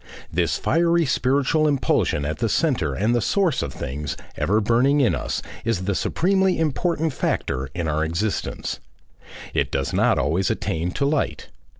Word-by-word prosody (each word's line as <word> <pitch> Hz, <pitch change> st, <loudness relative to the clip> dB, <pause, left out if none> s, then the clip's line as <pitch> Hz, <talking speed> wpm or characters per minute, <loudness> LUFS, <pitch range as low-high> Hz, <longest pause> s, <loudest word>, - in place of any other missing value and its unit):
This 85 Hz, 0 st, +1 dB
fiery 170 Hz, 0 st, +2 dB
spiritual 140 Hz, +3 st, +2 dB
impulsion 130 Hz, -, +1 dB
at 75 Hz, -, -3 dB
the 115 Hz, -2 st, 0 dB
centre 105 Hz, -, +1 dB
and 110 Hz, +5 st, +1 dB
the 120 Hz, -, +2 dB
source 165 Hz, -, +1 dB
of -, -, -3 dB
things, 70 Hz, 0 st, -5 dB, 0.2 s
ever 95 Hz, +9 st, +1 dB
burning 120 Hz, +7 st, +3 dB
in 130 Hz, -5 st, +3 dB
us, -, -, -3 dB, 0.2 s
is 115 Hz, -6 st, -1 dB
the 100 Hz, +2 st, 0 dB
supremely 190 Hz, -, +1 dB
important 160 Hz, 0 st, 0 dB
factor 65 Hz, -, -2 dB
in 85 Hz, -2 st, -2 dB
our 80 Hz, 0 st, 0 dB
existence. 85 Hz, +7 st, -2 dB, 0.7 s
It -, -, +1 dB
does 70 Hz, 0 st, -1 dB
not -, -, +3 dB
always 85 Hz, +6 st, +1 dB
attain 85 Hz, +2 st, -1 dB
to 140 Hz, -, 0 dB
light. 145 Hz, +1 st, -1 dB
115 Hz, 160 wpm, -23 LUFS, -, 0.7 s, burning